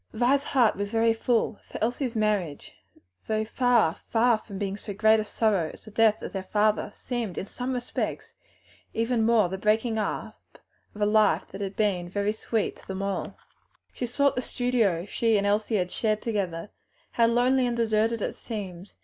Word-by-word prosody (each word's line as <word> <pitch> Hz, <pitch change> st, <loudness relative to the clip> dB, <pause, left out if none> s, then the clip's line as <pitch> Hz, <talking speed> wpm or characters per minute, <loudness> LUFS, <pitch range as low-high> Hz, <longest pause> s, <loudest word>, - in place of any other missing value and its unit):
Vi's 255 Hz, +4 st, +3 dB
heart 250 Hz, -6 st, +2 dB
was 200 Hz, 0 st, -3 dB
very 225 Hz, 0 st, +3 dB
full, 225 Hz, -1 st, 0 dB
for -, -, -9 dB
Elsie's 245 Hz, +1 st, -1 dB
marriage, 205 Hz, -9 st, -1 dB, 0.5 s
though 215 Hz, 0 st, 0 dB
far, 235 Hz, -7 st, +3 dB
far 230 Hz, +2 st, +1 dB
from 200 Hz, -3 st, -9 dB
being 195 Hz, -1 st, -2 dB
so 205 Hz, -1 st, -7 dB
great 220 Hz, +1 st, +5 dB
a -, -, 0 dB
sorrow 205 Hz, -6 st, +1 dB
as -, -, -15 dB
the 215 Hz, -, -11 dB
death 220 Hz, 0 st, +3 dB
of -, -, -6 dB
their 195 Hz, -, -2 dB
father, 210 Hz, +3 st, +1 dB
seemed 235 Hz, -7 st, -4 dB
in -, -, -3 dB
some 250 Hz, +5 st, -5 dB
respects 245 Hz, -1 st, -4 dB, 0.6 s
even 230 Hz, 0 st, +1 dB
more 225 Hz, -3 st, +4 dB
the 190 Hz, +2 st, -5 dB
breaking 220 Hz, +2 st, +1 dB
up 210 Hz, -, -5 dB, 0.4 s
of 210 Hz, -, -8 dB
a -, -, +4 dB
life 210 Hz, 0 st, +3 dB
that 195 Hz, -, -8 dB
had 195 Hz, 0 st, -4 dB
been 185 Hz, -5 st, 0 dB
very 205 Hz, +2 st, 0 dB
sweet. 220 Hz, 0 st, -2 dB, 1.1 s
She 245 Hz, -, -3 dB
sought 280 Hz, +3 st, +2 dB
the 250 Hz, -, 0 dB
studio 235 Hz, -10 st, 0 dB
she 225 Hz, +1 st, +1 dB
and 200 Hz, -, 0 dB
Elsie 210 Hz, +2 st, +1 dB
had 180 Hz, -3 st, 0 dB
shared 215 Hz, -2 st, 0 dB
together 195 Hz, -5 st, -2 dB, 0.4 s
(how 230 Hz, -1 st, +3 dB
lonely 250 Hz, +2 st, +3 dB
and 240 Hz, -1 st, -2 dB
deserted 225 Hz, 0 st, +1 dB
it -, -, -2 dB
seemed!) 195 Hz, -4 st, -7 dB
220 Hz, 175 wpm, -27 LUFS, 205-235 Hz, 1.1 s, great